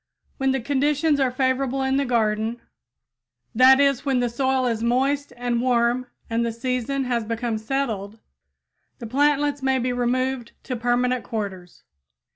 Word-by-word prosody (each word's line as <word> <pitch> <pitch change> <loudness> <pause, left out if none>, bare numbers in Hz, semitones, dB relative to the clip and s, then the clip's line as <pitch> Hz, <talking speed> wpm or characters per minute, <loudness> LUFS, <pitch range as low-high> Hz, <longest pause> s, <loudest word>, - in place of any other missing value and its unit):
When 270 0 +1
conditions 290 +3 +1
are 265 -2 +3
favorable 260 +1 0
in 265 0 +1
the 280 - +1
garden; 225 -1 0 0.9
that 260 +3 +7
is, 275 -2 +2
when 270 -3 +1
the 245 -1 0
soil 260 +2 0
is 230 -2 -1
moist 270 +4 0
and 240 -1 -1
warm 245 0 +1 0.2
and 230 +1 0
the 235 - -1
season 255 +3 -2
has 245 -2 -1
become 230 0 -2
settled, 220 -4 -3 0.8
the - - -8
plantlets 290 +3 +1
may 265 0 +1
be 250 0 -1
removed 245 0 -1
to 255 - -4
permanent 245 +1 0
quarters. 190 -5 -6
250 Hz, 145 wpm, -23 LUFS, 235-270 Hz, 0.9 s, that